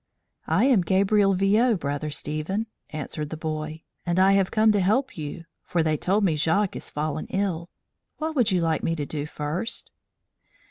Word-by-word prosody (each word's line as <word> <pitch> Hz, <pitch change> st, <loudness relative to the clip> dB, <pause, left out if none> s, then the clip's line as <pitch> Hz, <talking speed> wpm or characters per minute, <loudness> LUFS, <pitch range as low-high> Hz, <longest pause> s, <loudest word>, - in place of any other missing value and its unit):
"I 175 Hz, +10 st, +3 dB
am 255 Hz, -8 st, +5 dB
Gabriel 195 Hz, +2 st, +3 dB
Viaud, 210 Hz, +4 st, +3 dB
Brother 145 Hz, +1 st, -2 dB
Stephen," 155 Hz, +9 st, -2 dB, 0.2 s
answered 150 Hz, 0 st, -5 dB
the 160 Hz, -, -5 dB
boy, 155 Hz, 0 st, -4 dB, 0.2 s
"and 175 Hz, 0 st, -1 dB
I 190 Hz, +1 st, +6 dB
have 195 Hz, -1 st, +3 dB
come 220 Hz, 0 st, +4 dB
to 205 Hz, -, +2 dB
help 220 Hz, +9 st, +1 dB
you; 160 Hz, +2 st, -6 dB, 0.2 s
for 170 Hz, -2 st, 0 dB
they 155 Hz, -1 st, +2 dB
told 195 Hz, +7 st, +1 dB
me 170 Hz, -5 st, +3 dB
Jacques 165 Hz, +6 st, +1 dB
is -, -, -6 dB
fallen 155 Hz, +1 st, -3 dB
ill. 180 Hz, -4 st, -2 dB, 0.5 s
What 315 Hz, 0 st, -3 dB
would 245 Hz, -5 st, +3 dB
you 185 Hz, -3 st, +2 dB
like 160 Hz, -2 st, +1 dB
me 165 Hz, -, 0 dB
to 150 Hz, -3 st, -3 dB
do 150 Hz, 0 st, -4 dB
first?" 155 Hz, +10 st, -4 dB
175 Hz, 180 wpm, -25 LUFS, 155-200 Hz, 0.5 s, I